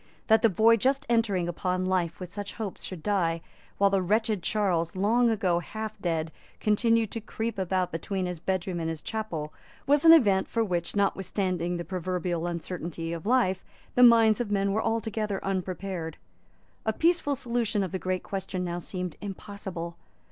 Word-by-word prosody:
That 220 0 +6
the 225 - +5
boy 225 +4 +5
just 270 +5 +1
entering 210 -7 +2
upon 180 +1 -1
life 180 -3 0
with 180 -1 -7
such 205 -1 -5
hopes 215 -5 -5
should 180 -5 -7
die, 170 -5 +1 0.4
while 200 0 +4
the 195 -1 +2
wretched 215 +2 +1
Charles, 175 -4 0
long 230 +5 +3
ago 190 -6 +1
half 215 +4 -5
dead, 165 -2 -1 0.3
continued 225 +1 +2
to 230 - -4
creep 225 0 -4
about 185 -1 0
between 185 +3 -2
his 180 -2 -4
bedroom 185 0 -2
and 165 -1 -2
his 160 -1 -5
chapel, 170 -9 -4 0.3
was 285 +2 +3
an 325 - +9
event 205 -12 +5
for 230 - 0
which, 175 -4 -2
notwithstanding 185 -3 0
the 170 - -5
proverbial 180 -2 -2
uncertainty 170 -1 -4
of 170 +3 -6
life, 225 -7 +2 0.3
the 250 - +3
minds 230 -2 +7
of 235 - -3
men 200 -1 +1
were 215 +2 +1
altogether 220 -3 -1
unprepared. 185 -3 -3 0.7
A 220 - 0
peaceful 330 0 +2
solution 235 -4 -1
of 185 - -4
the 190 - -2
great 185 0 -2
question 190 -1 -4
now 175 -1 -3
seemed 180 -1 -5
impossible. 190 -4 -6
195 Hz, 170 wpm, -28 LUFS, 175-220 Hz, 0.7 s, an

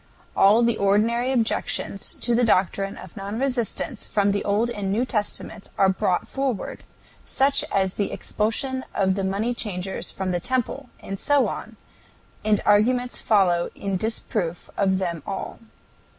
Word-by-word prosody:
All 210 +4 +6
the 235 -1 +2
ordinary 225 +5 +2
objections 225 -4 -1
to 240 - +1
the 240 +1 +3
doctrine 195 -2 +1
of - - -11
non 200 +1 -5
resistance 255 -1 -1
from 200 -1 +1
the 200 - -1
Old 215 +4 +1
and 205 -4 -2
New 230 +5 +1
Testaments 215 -2 -3
are 195 - +5
brought 185 -1 0
forward, 270 -6 -3 0.4
such 275 +1 +2
as 190 -1 +2
the 205 - -1
expulsion 260 +5 -1
of 190 -1 +2
the 195 - -2
moneychangers 195 -1 -2
from 190 -1 -3
the 175 - 0
Temple, 255 +4 -2
and 195 0 -5
so 290 -1 +3
on, - - -6 0.7
and 210 -1 +3
arguments 245 +4 +3
follow 180 -5 +3
in 195 -1 -2
disproof 185 -4 -2
of 190 -2 +2
them 170 -4 -2
all. 195 - -5
205 Hz, 150 wpm, -24 LUFS, 195-240 Hz, 0.7 s, All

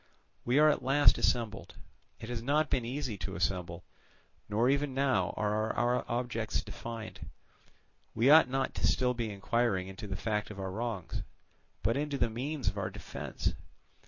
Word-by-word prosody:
We 125 +3 +2
are 155 +1 +7
at 150 - +3
last 135 +3 +5
assembled. 115 -2 0 0.4
It 110 - -8
has 120 -2 -3
not 145 +5 +1
been 125 -3 +1
easy 125 -4 -3
to 95 - -4
assemble, 85 -2 -2 0.7
nor 110 +4 +2
even 140 0 +1
now 135 -1 +2
are 110 +1 0
our 120 +1 +1
objects 120 -2 -1
defined. 115 -2 -7 0.9
We 115 - +3
ought 150 -2 +8
not 135 +1 -1
to - - -5
be - - +4
still 125 -1 +2
inquiring 110 -2 0
into 95 +2 -8
the 95 - -4
fact 105 +1 -1
of 105 -2 -8
our 95 -1 -3
wrongs, 110 -3 -3 0.6
but 115 +7 +2
into 145 -1 -1
the 120 -3 +1
means 135 +3 -3
of - - 0
our - - -2
defence. - - -4
115 Hz, 165 wpm, -31 LUFS, 105-135 Hz, 0.9 s, ought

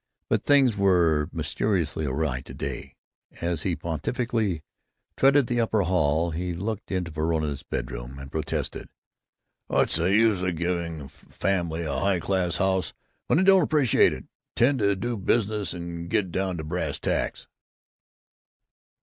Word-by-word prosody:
But - - +1
things 135 -6 +5
were 85 -6 +3
mysteriously 85 -7 -1
awry 65 -1 -1
to - - -11
day. - - -5 0.4
As 85 -2 -1
he 90 0 0
pontifically 95 - -2 0.5
tread 135 0 +5
the 120 0 0
upper 110 -2 +1
hall 85 -2 +1
he 90 +2 -3
looked 105 +4 -4
into 90 -3 -2
Verona's 75 -2 -1
bedroom - - -5
and 70 0 -9
protested, 80 -2 -3 0.8
"What's - - +2
the 85 +2 +1
use 110 -2 +4
of 90 -1 -1
giving 85 -1 -2
the 70 -3 -8
family 85 +3 -2
a 80 - -2
high 95 -2 +1
class 90 -2 0
house 95 0 0 0.3
when - - +3
they 185 - +4
don't 195 -1 +7
appreciate 145 -6 +4
it - - -6
and - - -27 0.3
tend 110 -7 +2
to 120 -1 -1
business 105 -1 0
and 85 -1 -6
get 95 -1 0
down 95 0 -1
to 80 - -4
brass 85 +4 -3
tacks?" - - -2
90 Hz, 150 wpm, -26 LUFS, 80-105 Hz, 0.8 s, don't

